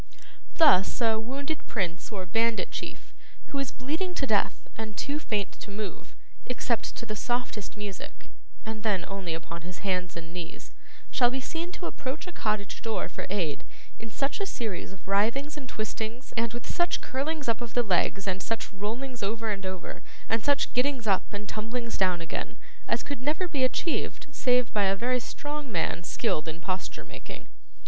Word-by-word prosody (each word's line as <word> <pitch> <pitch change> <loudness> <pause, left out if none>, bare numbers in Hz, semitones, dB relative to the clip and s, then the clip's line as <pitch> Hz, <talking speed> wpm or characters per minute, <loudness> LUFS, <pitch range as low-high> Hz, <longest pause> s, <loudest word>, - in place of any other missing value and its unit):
Thus, 195 - +7
a 225 -2 +4
wounded 275 +7 -3
prince 185 -3 -1
or 190 -3 -2
bandit 225 +4 +2
chief, - - -5 0.4
who 280 - 0
is 275 -3 +1
bleeding 335 +8 -1
to 275 - +2
death 215 -5 +2
and 220 -2 -5
too 285 +2 0
faint 210 -9 0
to - - -7
move, 205 -1 -5 0.3
except 245 -2 0
to - - -4
the 215 - -3
softest 230 -2 -1
music 205 -2 -6 0.4
(and 220 -1 -3
then 205 -5 +2
only 190 -4 -2
upon 170 +1 -5
his 180 +4 -7
hands 180 -3 +1
and 165 0 -7
knees), 175 -2 -6 0.4
shall 245 -3 +6
be 265 +2 -1
seen 330 +6 -3
to 355 - -4
approach 270 0 -3
a 360 - -5
cottage 210 - -1
door 225 -2 0
for - - -4
aid 175 -7 0 0.4
in 230 - -6
such 275 - 0
a 395 - +1
series 220 - -2
of 190 -1 -13
writhings 230 +10 +3
and 275 -4 -7
twistings, 220 +3 -3
and 230 -1 +2
with 240 0 -5
such 345 -1 +2
curlings 290 +2 -1
up 230 +1 +2
of 235 -1 -5
the 245 - +5
legs, 195 0 +3
and 190 0 +1
such 225 0 -1
rollings 230 +5 -3
over 220 +2 0
and 195 -2 -2
over, 185 -1 -4 0.3
and 225 0 +2
such 285 -1 +3
gettings 255 -1 +2
up 195 -3 +3
and 205 0 -4
tumblings 230 +2 -2
down 180 -3 +3
again, 215 +6 -3 0.3
as 230 - +2
could 285 -4 -4
never 305 +7 +2
be 285 -6 +1
achieved 295 +5 +1
save 250 -2 +3
by 205 -2 +4
a 195 0 +4
very 250 +4 +2
strong 290 +2 -4
man 170 -1 +1
skilled 155 -2 +1
in 160 +1 -3
posture 185 +1 -2
making. - - -8
225 Hz, 185 wpm, -30 LUFS, 195-260 Hz, 0.4 s, Thus